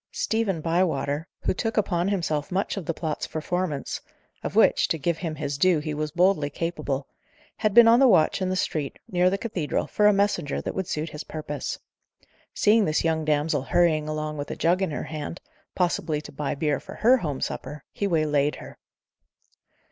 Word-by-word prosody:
Stephen 215 -7 0
Bywater, 160 -2 0
who - - 0
took 225 +4 -3
upon 180 -4 +1
himself 165 -7 -1
much 190 +2 -1
of 195 -6 -6
the 165 - 0
plot's 155 -3 -3
performance 160 -2 -3 0.4
of - - -5
which, - - +5
to 165 - 0
give 165 +2 -1
him 165 -3 -3
his 145 -2 -4
due, 185 +1 +4
he 150 0 -3
was 150 0 -2
boldly 175 -2 +2
capable 145 -3 -3 0.5
had 215 -3 0
been 235 -1 +9
on 230 +1 +7
the 270 - +6
watch 190 -5 +4
in 185 - 0
the 185 - 0
street, 155 -5 -2
near 180 0 +3
the 195 - 0
cathedral, 195 -8 -2
for 210 - +2
a - - +7
messenger 195 -7 0
that - - -4
would 190 -2 -3
suit 155 +2 -3
his 150 +1 -7
purpose. 150 -3 -5 0.7
Seeing 215 0 +3
this 155 0 +1
young 160 -1 +1
damsel 150 -1 +1
hurrying 155 +1 +2
along 155 0 -3
with 145 - -5
a - - -4
jug 175 +3 +2
in 190 - +1
her 150 - -4
hand, 155 +2 -6 0.4
possibly 170 -4 0
to - - -11
buy 145 0 -3
beer 145 -1 0
for 195 - -10
her 250 +4 +5
home 150 - -3
supper, 145 +1 -5
he 200 - -2
waylaid 150 -4 +1
her. - - -11
160 Hz, 195 wpm, -25 LUFS, 150-185 Hz, 0.7 s, been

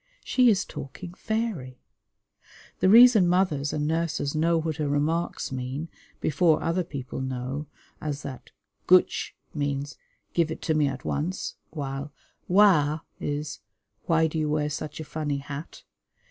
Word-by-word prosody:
She 250 -2 +4
is 195 -4 +2
talking 170 +6 -8
fairy. 190 - -3 1.0
The 185 - +4
reason 225 -3 +8
mothers 175 -6 +2
and 150 -1 -1
nurses 160 -3 -1
know 165 +2 +2
what 160 -1 -2
her 150 -2 -1
remarks 155 +4 0
mean, 130 +5 -4 0.3
before 160 0 +2
other 170 +2 +1
people 135 -6 -6
know, 130 +3 -4 0.3
as 145 -1 -4
that 130 -3 -8 0.4
"Guch" 185 0 +4 0.2
means 145 -1 -2 0.4
"Give 170 -2 +2
it 160 - -6
to 160 - +1
me 150 -2 +3
at 135 -2 -5
once," 165 +6 -2 0.2
while 140 -1 -5 0.4
"Wa" 165 -6 +4 0.2
is 145 +1 -3 0.5
"Why 160 -1 +4
do 160 0 -1
you 155 -1 0
wear 150 0 0
such 150 +2 -5
a 155 - -5
funny 145 -1 -2
hat?" 140 +2 -8
155 Hz, 145 wpm, -26 LUFS, 140-170 Hz, 1.0 s, reason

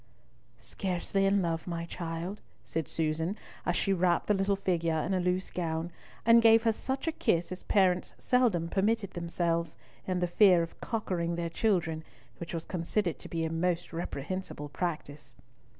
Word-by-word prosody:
"Scarcely 195 +1 -1
in 195 -1 +3
love, 165 0 -2
my 170 -1 -3
child," 170 +3 -5 0.2
said 160 -4 -3
Susan, 160 +5 -1 0.3
as 175 - +2
she 195 - +1
wrapped 175 -2 +2
the 210 - +3
little 195 0 +2
figure 170 -4 0
in 190 - -1
a 185 - +2
loose 180 +1 0
gown, 165 -1 -2 0.3
and 230 +1 +7
gave 225 0 +6
her 225 - +4
such 265 +4 -3
a - - +3
kiss 170 - 0
as 185 - -5
parents 185 -3 +2
seldom 230 -10 +2
permitted 200 +2 +1
themselves, 170 -1 -1 0.3
in 185 -1 0
the 180 - +2
fear 180 -1 +5
of 165 - -9
"cockering" 180 -7 -1
their 170 -1 -3
children, 165 -6 +1 0.4
which 170 - -6
was 165 -1 -4
considered 175 +1 -1
to - - -10
be 165 -1 -1
a 160 - -2
most 170 +1 -1
reprehensible 165 -1 -4
practice. 145 -3 -4
175 Hz, 165 wpm, -30 LUFS, 165-195 Hz, 0.4 s, and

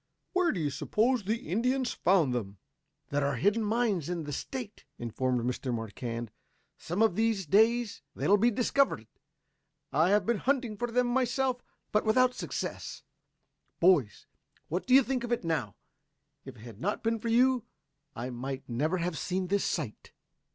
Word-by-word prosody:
Where 365 -2 +3
do 185 - -3
you 150 -3 -1
suppose 240 - +1
the 220 +3 -2
Indians 250 - 0
found 170 -8 +2
them?" 105 -5 -4 0.5
"There 145 0 0
are 140 -1 0
hidden 205 - +2
mines 210 - 0
in 175 -2 -2
the 145 -1 -5
State," 235 - -6
informed 125 +1 -1
Mr. 125 +2 -2
Marquand. 115 0 -4 0.5
"Some 180 +7 0
of 220 -6 +3
these 220 -3 +1
days 220 +6 +3
they - - -2
will 205 - +6
be 235 +4 +5
discovered. 245 - +1 0.9
I 160 +5 +4
have 205 +1 +3
been 235 -3 +1
hunting 255 -5 0
for 240 +4 -3
them 250 +1 +2
myself, 250 +1 0 0.3
but 210 - +2
without 250 +3 +3
success. - - -5 0.8
Boys, 160 - +3 0.4
what 180 +8 -2
do 255 - +6
you 270 - +8
think 255 -1 -2
of 240 - -4
it 240 - 0
now? 155 - -2 0.7
If 135 -1 -9
it 110 - -15
had 115 -1 -11
not 205 +3 -2
been 225 0 0
for 230 +1 -3
you 250 0 +3 0.5
I 125 +3 -4
might 130 +2 -5
never 150 +9 0
have 175 -2 -2
seen 185 0 -2
this 200 0 +2
sight." 140 -11 -4
200 Hz, 170 wpm, -30 LUFS, -, 0.9 s, you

